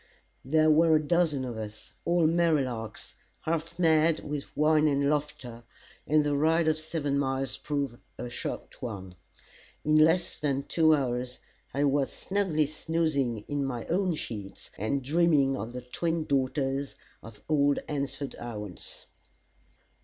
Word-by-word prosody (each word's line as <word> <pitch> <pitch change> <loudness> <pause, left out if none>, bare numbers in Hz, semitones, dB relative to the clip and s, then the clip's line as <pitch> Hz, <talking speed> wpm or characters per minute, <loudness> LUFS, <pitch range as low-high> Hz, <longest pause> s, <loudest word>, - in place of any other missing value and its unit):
There 155 +3 +4
were 160 +1 +5
a 155 - +2
dozen 165 -6 +2
of 120 -3 -5
us, 105 -1 -8
all 170 -1 +3
merry 165 -3 +3
larks, 115 -4 -6 0.3
half 165 +1 -2
mad 160 -2 +3
with 145 -1 -6
wine 155 0 +4
and 140 -1 +2
laughter, 135 -5 -3 0.5
and 155 0 +4
the 145 -1 +1
ride 160 +3 +3
of 155 0 +2
seven 155 -3 -1
miles 135 -1 -1
proved 140 -5 -3 0.2
a - - -5
short 120 - -6
one. 95 -6 -6 0.7
In 155 - +2
less 165 +3 +4
than 140 -2 0
two 155 +2 +4
hours, 125 -2 -2 0.3
I 140 - 0
was 140 -1 +2
snugly 190 -6 0
snoozing 145 -7 -1
in 145 -1 -1
my 125 -4 -3
own 180 -1 +1
sheets, 100 -8 -7
and 125 +7 -1
dreaming 150 -2 +3
of 115 -2 -5
the 125 +1 -6
twin 160 +6 -2
daughters 135 0 0 0.3
of 110 -2 -13
old 145 -2 +3
Hansford 140 -1 -3
Owens. 105 -6 -8
145 Hz, 145 wpm, -28 LUFS, 130-155 Hz, 0.7 s, were